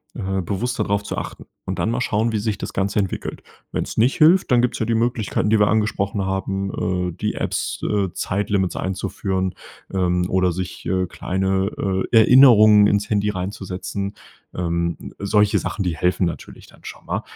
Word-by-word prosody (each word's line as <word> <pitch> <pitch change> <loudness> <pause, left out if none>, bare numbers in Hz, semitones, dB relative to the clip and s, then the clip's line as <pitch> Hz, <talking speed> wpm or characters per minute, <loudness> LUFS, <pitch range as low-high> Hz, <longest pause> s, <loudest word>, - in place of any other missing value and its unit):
äh, 95 -3 -2
bewusster 105 +6 -2
drauf 100 0 -1
zu 100 - -5
achten - - -6 0.2
und 95 - -3
dann 110 - 0
mal 120 +1 -1
schauen, 115 0 0
wie 105 - 0
sich 105 -2 -2
das - - -6
Ganze 100 +2 -1
entwickelt. 95 -2 -4 0.3
Wenn's - - -3
nicht 120 +4 +3
hilft, 165 +2 +5
dann 120 -1 +5
gibt's 125 -1 -1
ja 110 - 0
die 115 - +1
Möglichkeiten, 115 -2 0
die 110 - +4
wir 105 - +4
angesprochen 105 -2 0
haben, 95 -1 -2
äh, - - -7
die 105 +5 -3
Apps - - -3
äh, 100 -3 0
Zeitlimits 100 -1 -1
einzuführen, 95 0 -2 0.4
ähm, 90 -2 +1
oder 90 -1 +2
sich, 90 +1 -5
äh, 95 +1 +1
kleine, 95 +3 -1 0.4
äh, 115 - +5
Erinnerungen 110 -4 +7
ins 100 0 +1
Handy 105 -1 +1
reinzusetzen. 100 +1 -4 0.4
Ähm, 85 -1 -2
solche 105 +1 +2
Sachen, 100 - -3
die 85 -3 -1
helfen 90 +3 +1
natürlich 85 - -6
dann - - -20
schon - - -10
mal. - - -2
100 Hz, 175 wpm, -21 LUFS, 95-110 Hz, 0.4 s, Erinnerungen